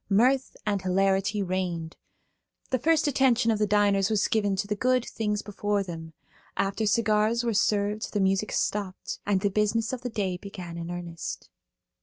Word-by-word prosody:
Mirth 250 +6 +3
and 205 -2 0
hilarity 195 +2 +1
reigned. 180 -3 -3 0.8
The 255 - +2
first 315 +4 +3
attention 255 -4 +3
of 215 - 0
the 210 - +2
diners 200 -1 +3
was 215 -2 +2
given 205 -3 +1
to 195 +2 -1
the 210 - -1
good 255 +3 +2
things 210 -2 -2
before 205 0 -1
them. 165 -3 -8 0.4
After 200 +2 0
cigars 220 +1 +2
were 235 -1 0
served 205 +1 +1
the 205 - -1
music 195 +2 +1
stopped, 200 -3 -2
and 195 -2 +2
the 200 - +2
business 215 +3 +1
of 255 - -4
the 250 - -3
day 195 -5 -2
began 180 -3 -8
in 170 0 -5
earnest. 175 -1 -6
205 Hz, 170 wpm, -27 LUFS, 190-220 Hz, 0.8 s, Mirth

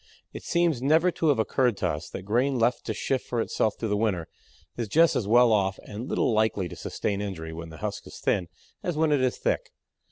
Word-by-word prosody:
It - - -7
seems 170 -7 +1
never 160 +6 +4
to 165 - -1
have 145 - +4
occurred 120 0 +1
to 90 - 0
us 75 +1 -4
that 95 - -7
grain 125 +7 +1
left 120 +1 +1
to - - -1
shift 135 -1 -1
for 120 - -3
itself 110 -1 0
through 110 - -3
the 105 - +1
winter 100 -6 0 0.5
is 120 -2 -3
just 165 +9 +4
as 105 - -1
well 120 +2 +6
off 95 -2 +1
and 110 +5 -6
little 120 - +1
likely 110 -4 +1
to - - -8
sustain 100 -1 -3
injury 80 -6 -5
when 80 0 -7
the 80 - -10
husk - - -5
is - - -10
thin 90 -3 0 0.3
as 175 -4 -3
when 160 -1 +2
it 145 -3 +3
is 130 -1 +1
thick. - - -1
115 Hz, 230 wpm, -27 LUFS, 100-135 Hz, 0.5 s, well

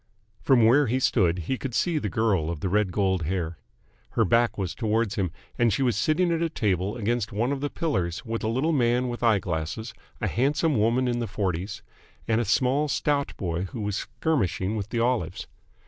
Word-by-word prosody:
From 125 -5 +4
where 130 +5 +5
he 125 +4 +1
stood 95 -9 +2
he 130 - -2
could 130 -4 -4
see 170 -3 +1
the 105 - -3
girl 95 -5 +1
of 85 -3 -4
the 95 - -1
red 105 0 +1
gold 95 -1 +1
hair. 85 -1 -2 0.5
Her 115 - +3
back 115 +2 +2
was 95 -3 -2
towards 110 -2 0
him, 95 -3 -1 0.3
and 120 -2 +4
she 120 +7 +1
was 120 -4 +2
sitting 155 - +2
at 165 0 0
a 165 - +1
table 100 - -1
against 115 0 -1
one 115 +6 0
of 140 -1 -2
the 145 - -1
pillars 95 - -2
with 115 0 -3
a - - 0
little 130 +8 +1
man 125 -2 +2
with 120 - -5
eye 115 -3 +4
glasses, 90 +6 -4 0.3
a - - -2
handsome 145 +5 +1
woman 115 +4 +2
in 120 -1 0
the 120 - -2
forties, 95 -2 -3 0.4
and 115 0 +2
a - - -1
small 130 +7 +2
stout 145 -1 0
boy 85 -1 -2
who 110 +4 -6
was 105 -1 -2
skirmishing 110 - -1
with 105 -1 -4
the 120 - -2
olives. 120 -8 0
115 Hz, 210 wpm, -26 LUFS, 95-130 Hz, 0.5 s, where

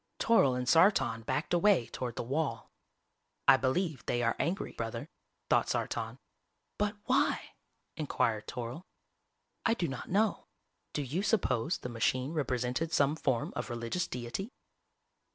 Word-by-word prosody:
Toryl 140 - +4
and 125 0 -3
Sartan 135 - +4
backed 155 - -1
away 175 - +4
toward 120 -1 -5
the - - -3
wall. 135 -1 -2 0.8
"I 135 - +10
believe 140 +4 0
they 120 0 +1
are 115 - +2
angry, 180 +5 -1
Brother," - - -5 0.4
thought - - +3
Sartan. - - -2 0.6
"But 205 0 +1
why?" 260 +2 +1 0.4
inquired 125 -8 0
Toryl. 125 +8 -5 0.8
"_I 230 0 +2
do 170 - 0
not 135 -2 -6
know. 210 +3 +1 0.5
Do 145 - -1
you 145 +8 -2
suppose 185 - +1
the - - -6
machine 130 +4 0
represented 130 +1 -1
some 145 -1 +3
form 130 -6 -1
of - - -3
religious 120 +9 -2
deity? 125 - -4
135 Hz, 135 wpm, -31 LUFS, 120-175 Hz, 0.8 s, I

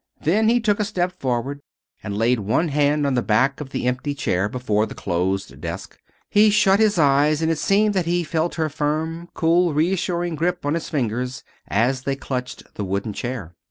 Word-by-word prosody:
Then 215 +8 +3
he 240 +1 +4
took 215 -3 +1
a - - +2
step 185 -4 -1
forward 130 +2 -2 0.4
and 105 -1 -4
laid 115 +2 +2
one 110 - 0
hand 145 0 +2
on 140 - +1
the 125 - +2
back 130 +6 +1
of 140 - -6
the 135 - -3
empty 130 +3 -1
chair 95 -6 0
before 110 -3 0
the - - -9
closed 95 +2 -2
desk. - - -6 0.3
He 210 +1 +5
shut 200 -1 +4
his 215 -3 +3
eyes 145 0 +4
and 160 - +2
it 160 - -1
seemed 210 +1 +3
that 185 -4 0
he 175 0 +1
felt 160 +2 -1
her 160 -2 0
firm, 155 +3 -2
cool, 170 -1 +2
reassuring 175 +1 0
grip 170 +1 -1
on 145 - +1
his 165 0 -3
fingers 125 -1 -2 0.2
as 125 +5 +1
they 135 0 -1
clutched 125 -2 -5
the 105 - -4
wooden 100 +2 -2
chair. 115 -8 -5
145 Hz, 195 wpm, -22 LUFS, 125-175 Hz, 0.4 s, He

